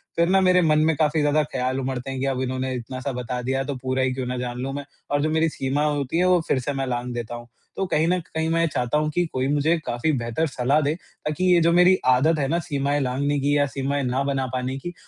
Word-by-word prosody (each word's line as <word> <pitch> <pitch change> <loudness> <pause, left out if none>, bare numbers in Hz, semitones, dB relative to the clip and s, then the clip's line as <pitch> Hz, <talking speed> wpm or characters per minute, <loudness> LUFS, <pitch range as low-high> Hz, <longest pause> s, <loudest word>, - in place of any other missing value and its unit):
फिर 170 0 +3
ना 190 +1 +5
मेरे 185 -1 +4
मन 155 -2 +3
में 160 0 +2
काफ़ी 155 +1 +1
ज़्यादा 150 +1 +3
ख़्याल 130 -2 -2
उमड़ते 130 -1 -3
हैं 135 - -4
कि 135 - -1
अब 135 -1 -1
इन्होंने 130 0 -2
इतना-सा 130 +3 -5
बता 125 0 -4
दिया 135 +2 -1
तो 140 0 -4
पूरा 130 +1 -2
ही 130 -1 0
क्यों 130 0 -3
ना 125 0 -3
जान 125 0 -4
लूँ 135 +1 -3
मैं। 140 0 -5 0.3
और 145 0 +2
जो 155 - +1
मेरी 160 +1 +2
सीमा 135 0 -1
होती 145 0 -1
है 180 - +3
वो 180 -1 +4
फिर 130 - +2
से 135 +3 -3
मैं 135 -1 -2
लाँघ 120 0 -2
देता 120 0 -5
हूँ। 120 0 -9 0.3
तो 195 - -1
कहीं 155 +2 +2
न 180 +1 +2
कहीं 160 -1 -3
मैं 165 0 +2
चाहता 125 +4 0
हूँ 150 0 0
कि 175 +3 +1
कोई 130 0 0
मुझे 155 +4 +2
काफ़ी 120 +7 0
बेहतर 120 +7 -1
सलाह 135 +2 +1
दे 145 +1 +1 0.3
ताकि 155 +4 -2
ये 175 - +5
जो 165 +1 +4
मेरी 180 +2 +6
आदत 145 +5 +4
है 140 - 0
ना 170 +5 +1
सीमाएँ 145 -1 0
लाँघने 140 +3 0
की 145 +1 +1
या 145 - +3
सीमाएँ 140 +1 -2
ना 125 +1 0
बना 135 -1 -1
पाने 130 +1 -2
की 175 +5 -6
140 Hz, 265 wpm, -23 LUFS, 130-155 Hz, 0.3 s, मेरी